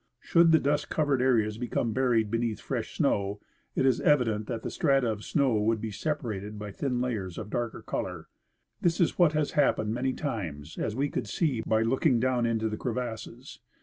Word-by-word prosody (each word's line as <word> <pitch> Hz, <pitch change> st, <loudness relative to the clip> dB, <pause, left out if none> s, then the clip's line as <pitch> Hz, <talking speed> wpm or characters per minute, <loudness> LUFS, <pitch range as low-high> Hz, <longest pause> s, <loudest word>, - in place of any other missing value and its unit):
Should 170 Hz, -1 st, +4 dB
the 160 Hz, -, +7 dB
dust 145 Hz, +1 st, 0 dB
covered 145 Hz, -4 st, +1 dB
areas 110 Hz, -4 st, +2 dB
become 120 Hz, -2 st, -1 dB
buried 120 Hz, -4 st, +2 dB
beneath 115 Hz, -2 st, -1 dB
fresh -, -, -4 dB
snow, 100 Hz, +1 st, +1 dB, 0.4 s
it -, -, +2 dB
is 130 Hz, -3 st, +3 dB
evi 145 Hz, -4 st, +4 dB
dent 110 Hz, -2 st, -2 dB
that 115 Hz, -, -4 dB
the -, -, -4 dB
strata 135 Hz, -4 st, +2 dB
of 105 Hz, -1 st, -6 dB
snow 140 Hz, -5 st, +1 dB
would 110 Hz, +1 st, +1 dB
be 110 Hz, 0 st, -4 dB
separated 105 Hz, -7 st, -3 dB
by 105 Hz, 0 st, -6 dB
thin 125 Hz, +3 st, -2 dB
layers 105 Hz, -8 st, -3 dB
of 105 Hz, -1 st, -6 dB
darker 120 Hz, -1 st, -3 dB
color. -, -, -4 dB, 0.5 s
This 170 Hz, -1 st, +1 dB
is 175 Hz, -, +1 dB
what 170 Hz, -3 st, +5 dB
has 150 Hz, -1 st, 0 dB
happened 110 Hz, -7 st, +2 dB
many 130 Hz, +2 st, -1 dB
times, 85 Hz, -, -5 dB
as 105 Hz, -, -2 dB
we 140 Hz, +3 st, 0 dB
could -, -, -3 dB
see 140 Hz, -9 st, 0 dB
by 110 Hz, 0 st, +3 dB
looking 130 Hz, +2 st, +2 dB
down 125 Hz, -1 st, +1 dB
into 110 Hz, -1 st, 0 dB
the 110 Hz, 0 st, -3 dB
crevasses. 120 Hz, 0 st, -5 dB
120 Hz, 195 wpm, -28 LUFS, 110-135 Hz, 0.5 s, the